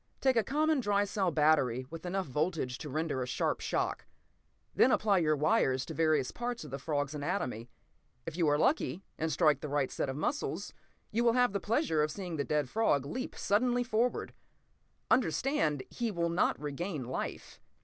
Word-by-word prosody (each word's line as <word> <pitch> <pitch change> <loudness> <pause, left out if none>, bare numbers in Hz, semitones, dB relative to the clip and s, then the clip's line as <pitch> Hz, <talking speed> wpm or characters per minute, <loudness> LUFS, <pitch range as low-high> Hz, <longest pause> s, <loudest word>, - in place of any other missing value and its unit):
"Take 265 -1 +3
a 225 - +3
common 305 +3 +1
dry 205 -4 +2
cell 195 -2 0
battery 150 -6 +2
with 165 +2 -7
enough 190 +1 -1
voltage 150 -2 -2
to 150 - -6
render 155 -2 -1
a 125 - -2
sharp - - -1
shock. - - -2 0.7
Then - - +5
apply 205 -3 +3
your 155 -2 +2
wires 140 - +2
to - - -6
various 155 -5 +2
parts 240 0 -4
of - - -10
the 135 - -4
frog's 145 0 -2
anatomy. 145 - -3 0.6
If - - -5
you 170 -3 +2
are 145 0 +3
lucky, 195 - +1 0.2
and 160 0 0
strike 155 0 +3
the 150 - -5
right 140 -2 0
set - - -2
of 135 - -3
muscles, 220 - -2 0.4
you 230 +3 +1
will 235 -1 +4
have 245 -3 +3
the 200 - 0
pleasure 220 - +1
of 150 - +1
seeing 175 -2 -5
a - - 0
dead 150 -1 0
frog 145 - +1
leap 255 - -5
suddenly 245 +4 +1
forward. 240 +1 0 0.8
Understand, 160 - +2
he 235 -1 -2
will 170 -4 -1
not 170 +2 +1
regain 150 +1 -4
life. 130 - -5
165 Hz, 185 wpm, -31 LUFS, 145-220 Hz, 0.8 s, Then